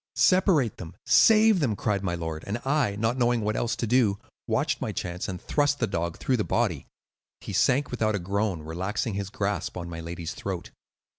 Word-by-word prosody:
"'Separate 185 - +3
them! 85 0 -9
save 220 -3 +6
them!' 125 -9 +1
cried 100 0 -1
my 90 -2 -1
lord; 80 -2 -5
and 105 +3 -1
I, 135 -7 +1
not 115 +4 0
knowing 120 -1 +2
what 105 +1 -1
else 120 - 0
to - - -2
do, 115 -4 +3 0.3
watched - - 0
my - - -2
chance 90 0 -4
and 90 -1 -4
thrust 145 - +1
the 120 - +1
dog 85 -5 -3
through 130 - 0
the 105 - 0
body. 100 -13 -1 0.5
He - - -7
sank 135 +2 +2
without 110 -3 0
a - - -1
groan, 100 -2 -1
relaxing 95 +8 -3
his 100 -1 -3
grasp 100 -1 -2
on 85 -1 -6
my 85 - -6
lady's 85 0 -5
throat. - - -5
105 Hz, 200 wpm, -26 LUFS, 90-125 Hz, 0.5 s, save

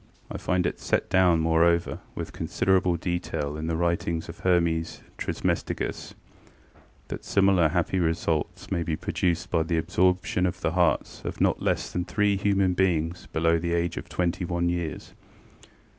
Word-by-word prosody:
I - - -4
find 90 -1 0
it - - -2
set - - -1
down, 90 -3 +4
moreover, 85 +1 +2 0.2
with - - -5
considerable 90 -2 +1
detail 85 -4 -3
in 80 +1 -4
the 80 - 0
writings 85 -1 -1
of 85 - -9
Hermes 85 -2 +1 0.2
Trismegistus, - - -2 0.9
that - - -6
similar 95 -4 +3
happy 90 +2 0
results 80 -2 -1
may 85 - 0
be 80 -1 -1
produced 90 +3 -1
by 80 - +2
the 80 +1 0
absorption 90 +2 +1
of 90 0 -5
the 80 - 0
hearts 90 -1 +1
of - - -5
not - - +2
less - - 0
than 90 0 -2
three 105 -1 +1
human 100 -2 +2
beings 85 -2 0
below 80 +1 +2
the 85 +1 -1
age 85 0 0
of - - -7
twenty 90 +1 -1
one 85 0 0
years. 85 -2 -4
85 Hz, 160 wpm, -26 LUFS, 80-90 Hz, 0.9 s, down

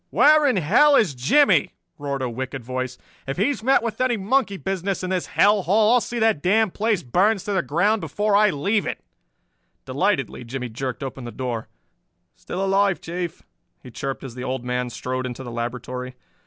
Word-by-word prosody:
"Where 300 0 +5
in 255 - +2
hell 235 - +5
is 210 - +3
Jimmie?" 160 - +3 0.2
roared 140 -2 -3
a - - 0
wicked 130 +1 -5
voice. 130 +1 -4 0.3
"If 135 - -3
he's 250 +8 0
met 265 +1 +3
with 230 +1 -3
any 255 -2 +2
monkey 205 0 0
business 195 0 -3
in 185 - -3
this 185 -2 -1
hell 205 +1 +3
hole 210 +5 +3
I'll 245 - +4
see 240 - -5
that 220 -9 +2
the 180 - 0
damned 220 -1 +3
place 215 -3 0
burns 190 - +2
to 205 - -4
the 190 - +2
ground 180 - +1
before 210 0 0
I 210 +1 +5
leave 200 +7 0
it!" - - -5 0.8
Delightedly - - -1
Jimmie 125 +1 -5
jerked 130 +3 -5
open 135 -1 -6
the 120 - -6
door. 120 -3 -4 0.7
"Still 185 - -4
alive, 195 -1 +2
Chief," 175 0 -5 0.4
he 125 - -11
chirped 135 +3 -5
as 130 -3 -7
the 125 +1 -7
Old 130 -1 -3
Man 125 0 -2
strode 130 +2 -4
into 125 +1 -7
the 120 - -7
laboratory. 125 +2 -5
175 Hz, 195 wpm, -23 LUFS, 130-210 Hz, 0.8 s, Where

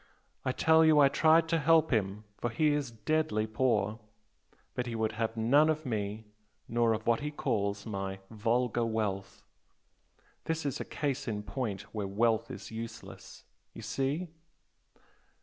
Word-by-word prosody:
I 130 - 0
tell 160 +4 +4
you 160 -1 +5
I 140 -1 +7
tried 160 +3 +4
to 165 0 +2
help 160 -1 +4
him 105 -1 0 0.2
for 120 - -1
he 150 +7 +2
is 145 -3 0
deadly 115 -1 0
poor. 110 -1 0 0.7
But 125 0 -3
he 115 - -4
would 110 -1 0
have 115 +1 -3
none 140 +8 +4
of 155 0 -1
me 110 -2 -3 0.4
nor 115 -1 +2
of 110 0 -4
what 115 -1 +3
he 150 - -3
calls 100 -8 -2
my 95 -3 -4
'vulgar 120 +2 0
wealth.' 100 -4 -2 1.0
This 160 -1 -2
is 140 - -2
a - - -4
case 140 -3 -3
in 105 -2 -3
point 105 -6 -4
where 105 -3 -2
wealth 110 +3 +1
is - - -8
useless! 115 0 -9 0.3
You - - -8
see?" 145 +6 -2
115 Hz, 155 wpm, -31 LUFS, 110-145 Hz, 1.0 s, I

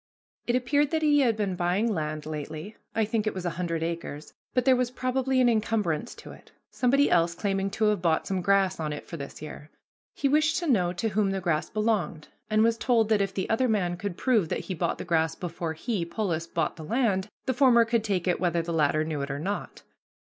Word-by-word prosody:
It 240 - +2
appeared 285 +3 +2
that 315 0 -1
he 295 -1 +4
had 235 -5 +2
been 200 -4 -1
buying 185 +6 +1
land 155 -3 -3
lately 155 +6 -6 0.2
I 220 - +2
think 220 0 -1
it 215 - -1
was 185 -1 -5
a 175 - 0
hundred 165 -2 -1
acres 165 -3 -5 0.2
but 250 -1 +2
there 260 -1 +6
was 250 -1 0
probably 255 +1 0
an 250 - +5
incumbrance 215 -4 0
to - - -11
it, - - -15 0.2
somebody 275 +3 +2
else 170 0 +3
claiming 195 +1 -1
to 220 - -3
have 210 -3 +2
bought 165 -2 +1
some 190 -1 -1
grass 195 -1 +2
on 155 -2 -2
it 145 - -7
for 165 - -7
this 140 +1 -8
year. 150 0 -9 0.5
He 280 - +1
wished 305 +3 +3
to 350 - -2
know 190 - +2
to 185 +5 -2
whom 205 -1 +1
the 195 0 -1
grass 170 -4 -1
belonged, 210 -8 -1 0.2
and 215 0 +3
was 230 0 +2
told 230 -4 +2
that 215 -2 +3
if 195 -1 0
the 190 - -1
other 240 +4 +2
man 180 -5 +1
could 180 0 -5
prove 220 -10 +2
that - - -1
he 190 - -5
bought 165 - -1
the - - -6
grass 160 -2 +1
before 170 -2 -4
he, 200 +3 -2
Polis, 170 -2 -2
bought 165 -1 -2
the 160 - -8
land, 205 0 0 0.2
the 260 - +1
former 245 -3 +5
could 230 -1 +1
take 190 -5 -1
it 180 - +1
whether 170 -2 +1
the 170 0 -4
latter 155 -1 +2
knew 155 -2 -3
it 140 - -4
or 140 - -3
not. 195 +7 -4
195 Hz, 235 wpm, -27 LUFS, 165-230 Hz, 0.5 s, there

